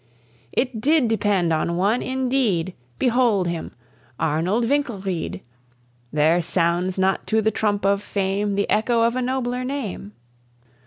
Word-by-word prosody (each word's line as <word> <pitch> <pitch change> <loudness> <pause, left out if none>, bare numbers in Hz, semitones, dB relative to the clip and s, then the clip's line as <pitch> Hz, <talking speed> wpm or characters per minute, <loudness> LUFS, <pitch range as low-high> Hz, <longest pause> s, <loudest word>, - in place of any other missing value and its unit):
It 250 -4 -1
did 295 0 +3
depend 205 -6 +1
on 170 +2 0
one 205 +6 +2
indeed; 250 -9 0 0.2
Behold 235 -7 +2
him, 170 -1 -4 0.5
Arnold 180 +10 +1
Winkelried; 195 - -2 0.7
There 155 +4 +3
sounds 175 +2 0
not 190 0 +1
to 220 - +2
the 220 0 +2
trump 205 -2 0
of 200 0 +2
fame 200 0 -1
The 200 - 0
echo 230 +2 +2
of 230 +1 +2
a 255 - 0
nobler 250 0 -1
name. 250 - -5
205 Hz, 135 wpm, -22 LUFS, 180-245 Hz, 0.7 s, did